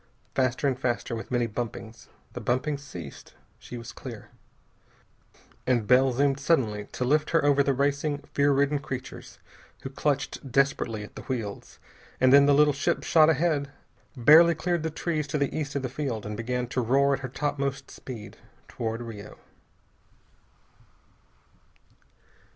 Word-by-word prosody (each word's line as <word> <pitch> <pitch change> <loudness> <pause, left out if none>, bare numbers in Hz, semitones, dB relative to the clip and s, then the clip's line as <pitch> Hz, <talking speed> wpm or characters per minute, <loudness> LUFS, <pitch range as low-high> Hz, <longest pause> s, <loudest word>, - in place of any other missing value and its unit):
Faster 130 +1 +1
and 130 -2 -1
faster, 120 -2 -2
with 115 - -7
many 120 -1 +1
bumpings. 115 0 -6 0.3
The - - -6
bumpings 140 +4 -1
ceased. 90 - -10 0.2
She 120 - -9
was 115 0 -8
clear. - - -9 1.4
And 120 -4 +2
Bell 130 +3 +5
zoomed 135 +2 +1
suddenly 120 -9 +1
to 125 - -2
lift 150 +4 +2
her 165 -3 +2
over 140 -1 +4
the 140 -1 +1
racing, 140 +1 0
fear 145 0 +3
ridden 140 +1 +2
creatures 130 -2 -7 0.5
who 135 - -6
clutched 140 -1 -2
desperately 130 -5 +1
at 105 - -12
the - - -7
wheels, 115 -6 -5 0.4
and 130 0 +5
then 140 0 +7
the 145 - +5
little 150 0 +5
ship 140 +2 -1
shot 155 -1 +5
ahead, 155 -3 +1 0.5
barely 160 +7 +7
cleared 175 +1 -1
the 160 - -2
trees 155 -1 -2
to 145 - -2
the 140 -1 -1
east 145 -3 -3
of 140 - -1
the - - -1
field, 130 -4 -4
and 105 0 -4
began 125 +2 -2
to 125 - -1
roar 135 +4 +3
at 135 - -1
her 130 -1 -6
topmost 140 0 -3
speed 115 -6 -9 0.3
toward 115 0 -4
Rio. 105 -3 -9
135 Hz, 155 wpm, -27 LUFS, 120-145 Hz, 1.4 s, then